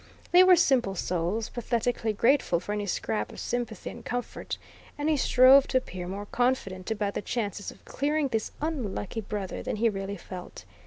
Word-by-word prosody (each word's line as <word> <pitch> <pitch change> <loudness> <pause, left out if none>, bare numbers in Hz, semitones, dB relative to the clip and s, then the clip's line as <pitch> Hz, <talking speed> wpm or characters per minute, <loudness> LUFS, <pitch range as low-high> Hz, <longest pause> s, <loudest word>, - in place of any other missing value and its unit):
They 355 - +8
were 370 0 +8
simple 245 - +3
souls, 180 +5 -1
pathetically 235 -1 -1
grateful 230 -4 +3
for 195 - -6
any 205 -1 -2
scrap 110 - -2
of - - -10
sympathy 240 -4 -3
and - - -11
comfort, 245 0 -4 0.4
and 290 +1 -1
he 310 - +3
strove 260 0 +6
to 260 - +2
appear 185 -8 -4
more 200 +3 -5
confident 205 -6 -1
about 205 -2 -1
the - - -2
chances 205 -3 -3
of - - -14
clearing 295 0 0
this 225 -3 -2
unlucky 230 - -3
brother 200 -2 -4
than - - -3
he 230 +2 +2
really 195 0 -4
felt. 180 0 -9
220 Hz, 175 wpm, -28 LUFS, 195-255 Hz, 0.4 s, They